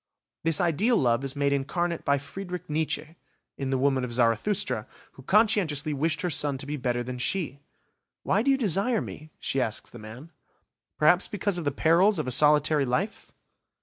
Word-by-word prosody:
This 165 -2 +4
ideal 185 - +2
love 120 0 +1
is 135 +1 -4
made 140 0 +1
incarnate 170 +5 -2
by 140 -1 +2
Frederick 180 +5 -7
Nietzsche, 155 +1 -3 0.4
in 135 -1 -4
the 135 - +1
woman 135 -1 +1
of 125 - -4
Zarathustra, 120 - 0 0.2
who - - -15
conscientiously 180 - +2
wished 150 +2 0
her 180 - -1
son 145 -1 +2
to 135 - -6
be 145 +1 -4
better 125 -3 -2
than 125 0 -6
she. 145 -1 -1 0.6
"Why 200 - +1
do 270 - 0
you 270 - +4
desire 215 +1 +1
me?", 155 -4 -8
she 135 - -1
asks 110 -3 -4
the 120 - -11
man. 120 +9 -11 0.7
"Perhaps 175 +5 +4
because 205 -2 -2
of 165 - -6
the 145 - +1
perils 170 +8 +3
of - - -2
a 125 - -3
solitary 150 +2 +4
life? 185 - -3
150 Hz, 180 wpm, -26 LUFS, 135-180 Hz, 0.7 s, This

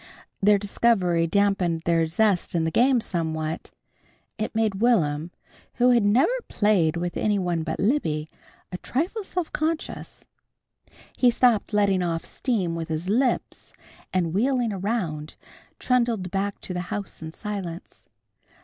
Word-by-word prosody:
The 205 +1 +5
discovery 195 -5 +1
dampened 190 -3 +1
their 165 -1 +2
zest 190 +1 +1
in 165 - +2
the 160 - 0
game 250 +5 +3
somewhat. 160 -4 -3 0.7
It 215 +1 -3
made 215 -3 0
Will'm, 165 -10 +2 0.5
who 250 0 +4
had 240 -1 +4
never 250 - +3
played 185 -7 +2
with 175 0 -3
any 210 -1 +1
one 175 -3 -1
but 160 0 -4
Libby, 160 - 0 0.4
a 180 - -5
trifle 355 - -2
self 360 -3 -4
conscious. 315 +1 -3 0.9
He 250 - +4
stopped 235 -3 +2
letting 200 -3 +2
off 165 -2 -2
steam 200 -10 -1
with 165 -1 -4
his 160 +3 -3
lips, 250 +4 0 0.4
and 175 -3 0
wheeling 240 +1 +1
around, 180 -7 -3 0.4
trundled 235 -7 0
back 200 +1 -2
to 185 - -5
the 180 - -2
house 205 -5 -5
in 160 0 -6
silence. 190 -3 -6
195 Hz, 140 wpm, -25 LUFS, 170-235 Hz, 0.9 s, The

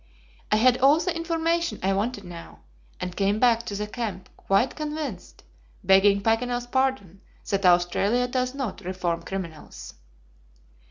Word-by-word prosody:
"I - - +5
had 250 +3 +4
all 280 +4 +5
the 360 0 -2
information 335 0 -1
I 195 +1 +2
wanted 205 +2 -2
now, 170 -2 -11 0.4
and 180 -1 -5
came 200 +1 +1
back 235 -1 +4
to 200 - -4
the 210 +1 -2
camp 210 -4 -5
quite 200 +7 +1
convinced, 300 - -6 0.4
begging 200 +1 +4
Paganel's 245 +2 0
pardon, 245 -8 -1 0.3
that 195 -1 +2
Australia 195 +7 +2
does 255 +1 -2
not 265 -7 -4
reform 180 -2 -2
criminals." 170 -5 -7
215 Hz, 140 wpm, -25 LUFS, 195-255 Hz, 0.4 s, I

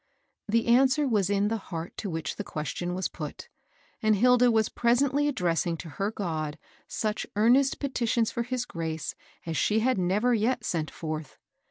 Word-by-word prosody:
The 230 +2 +2
answer 260 +4 +4
was 205 -6 +1
in 205 0 +2
the 225 0 -1
heart 165 -1 -5
to 205 - -4
which 160 -2 -4
the - - -3
ques 150 -1 -4
tion 175 0 -3
was 185 - -1
put, - - -8 0.5
and 215 -1 +4
Hilda 250 +3 +5
was 220 -2 +3
presently 270 +5 +2
addressing 175 - 0
to 165 - -8
her 195 +7 -2
God 160 -7 -3 0.3
such 215 -1 -2
earnest 250 +6 +4
petitions 240 -5 0
for 235 - -2
his 245 +1 -2
grace 160 -5 -4 0.3
aa 165 - -3
she 210 +7 +2
had 255 -3 +2
never 205 +7 +2
yet 230 +3 +1
sent 160 -3 -2
fextiv. 155 -3 -5
215 Hz, 175 wpm, -28 LUFS, 170-245 Hz, 0.5 s, Hilda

